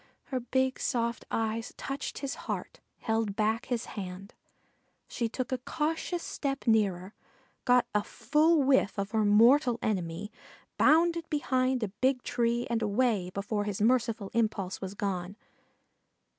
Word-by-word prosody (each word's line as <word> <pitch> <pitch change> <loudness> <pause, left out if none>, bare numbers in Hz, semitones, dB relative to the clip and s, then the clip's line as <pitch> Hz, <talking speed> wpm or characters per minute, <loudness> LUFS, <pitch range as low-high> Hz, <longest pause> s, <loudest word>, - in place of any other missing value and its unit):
Her 255 - +1
big 260 +2 0
soft 235 -3 -1
eyes 225 0 -2
touched 275 +1 -4
his 275 -1 -3 0.2
heart, - - -4 0.2
held 220 -3 0
back 220 +1 0
his 240 -3 -2
hand; 195 +1 -7 0.7
she 235 -3 -2
took 255 +3 -4
a 255 - 0
cautious 320 +6 -2
step 275 -1 -3
nearer, 200 -4 +1 0.5
got 250 -1 +5
a 210 0 +2
full 300 +9 +2
whiff 265 -7 +3
of 200 0 -2
her 220 -1 +2
mortal 235 +5 +5
enemy, 190 0 -2 0.5
bounded 335 +1 +4
behind 260 -4 +1
a 210 - -1
big 255 +5 0
tree 235 0 0
and 230 -1 -1
away 210 -4 +1
before 205 +1 -2
his 205 -2 -3
merciful 230 -2 +1
impulse 215 -5 -1
was 190 0 -5
gone. 190 -1 -3
230 Hz, 140 wpm, -29 LUFS, 205-260 Hz, 0.7 s, got